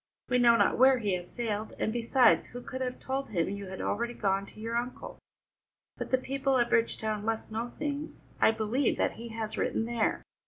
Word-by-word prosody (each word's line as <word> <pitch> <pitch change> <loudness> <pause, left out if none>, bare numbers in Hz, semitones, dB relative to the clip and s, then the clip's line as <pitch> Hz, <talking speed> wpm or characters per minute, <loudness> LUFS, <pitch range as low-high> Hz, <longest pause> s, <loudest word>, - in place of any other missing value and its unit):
We 250 0 +3
know 235 -1 +6
not 230 - +3
where 260 0 +7
he 210 -5 -1
has 180 -1 -4
sailed, 220 -2 -3
and 220 - -1
besides, 240 +1 +4
who 245 +1 -9
could 260 - -6
have 250 -1 -3
told 270 +1 -3
him 170 -5 0
you 200 -1 -5
had 190 0 -6
already 235 +3 -1
gone 195 -1 0
to - - -14
your 225 +2 -3
uncle? 245 +1 -4 0.8
But - - -5
the 260 - +4
people 270 +1 0
at 240 -1 +1
Bridgetown 220 -2 +1
must 225 0 -2
know 230 +2 -3
things. 295 0 -4 0.2
I - - +6
believe 225 +4 +1
that - - +2
he 235 +1 -9
has 220 -1 -4
written 225 - 0
there." 235 -1 0
230 Hz, 205 wpm, -30 LUFS, 215-255 Hz, 0.8 s, where